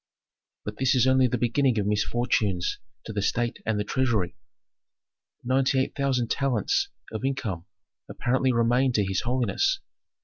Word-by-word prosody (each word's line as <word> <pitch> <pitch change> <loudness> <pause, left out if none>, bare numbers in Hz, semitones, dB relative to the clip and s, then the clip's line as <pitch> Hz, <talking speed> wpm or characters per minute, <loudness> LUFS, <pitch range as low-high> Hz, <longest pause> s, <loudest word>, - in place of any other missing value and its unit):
"But 105 0 -5
this 130 0 +2
is 125 - +4
only 130 0 +4
the 125 - -1
beginning 120 +1 +1
of 105 - 0
misfortunes 105 -3 0 0.3
to 110 - -6
the 105 - -1
state 120 +3 -1
and 110 -2 +1
the - - 0
treasury. 110 -6 0 1.1
Ninety 130 +2 +2
eight 130 - -1
thousand 130 -4 0
talents 390 - +1 0.2
of 110 +2 -5
income 110 -10 -3 0.4
apparently 130 +1 +1
remain 120 +2 +2
to 105 -4 +2
his 95 0 -1
holiness. 130 - 0
120 Hz, 145 wpm, -26 LUFS, 110-130 Hz, 1.1 s, is